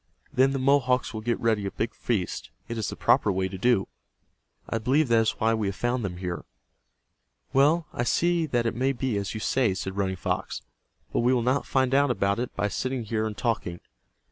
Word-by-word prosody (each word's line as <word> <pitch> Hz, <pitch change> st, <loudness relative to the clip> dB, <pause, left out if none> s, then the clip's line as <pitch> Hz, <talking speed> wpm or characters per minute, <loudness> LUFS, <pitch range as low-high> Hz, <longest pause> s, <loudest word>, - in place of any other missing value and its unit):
Then 130 Hz, +1 st, +4 dB
the 135 Hz, -, -1 dB
Mohawks 130 Hz, -2 st, +2 dB
will 110 Hz, -, -4 dB
get 120 Hz, +1 st, -1 dB
ready 110 Hz, -3 st, +1 dB
a -, -, -4 dB
big 115 Hz, -, -3 dB
feast. 105 Hz, -7 st, -2 dB, 0.2 s
It 115 Hz, -, -4 dB
is 110 Hz, -3 st, -2 dB
the -, -, -5 dB
proper 105 Hz, -, +3 dB
way 95 Hz, 0 st, 0 dB
to 95 Hz, -, -7 dB
do. 120 Hz, -3 st, +3 dB, 0.8 s
I 115 Hz, -, -1 dB
believe 130 Hz, +5 st, +2 dB
that 115 Hz, -1 st, +5 dB
is 110 Hz, -, +2 dB
why 110 Hz, +1 st, +1 dB
we 110 Hz, -2 st, 0 dB
have 100 Hz, -, -2 dB
found 120 Hz, +2 st, -1 dB
them 90 Hz, -3 st, -4 dB
here." 90 Hz, -1 st, -4 dB, 1.1 s
"Well, 150 Hz, +5 st, +4 dB
I -, -, -2 dB
see 170 Hz, +6 st, +2 dB
that 120 Hz, -4 st, 0 dB
it 115 Hz, -, 0 dB
may 130 Hz, +3 st, +1 dB
be 125 Hz, -2 st, -2 dB
as 100 Hz, +2 st, -3 dB
you -, -, -3 dB
say," 115 Hz, -3 st, +1 dB
said 95 Hz, +1 st, -4 dB
Running 95 Hz, -1 st, 0 dB
Fox. 90 Hz, -, -3 dB, 0.5 s
"But -, -, +1 dB
we 125 Hz, +2 st, +3 dB
will 120 Hz, -, +1 dB
not 130 Hz, +3 st, +1 dB
find 130 Hz, -1 st, +1 dB
out 140 Hz, +1 st, +4 dB
about 100 Hz, -2 st, +1 dB
it 125 Hz, -, -2 dB
by 105 Hz, -, 0 dB
sitting 130 Hz, +4 st, -2 dB
here 110 Hz, 0 st, -1 dB
and 105 Hz, -, -6 dB
talking. 100 Hz, -7 st, -1 dB
115 Hz, 220 wpm, -26 LUFS, 100-130 Hz, 1.1 s, that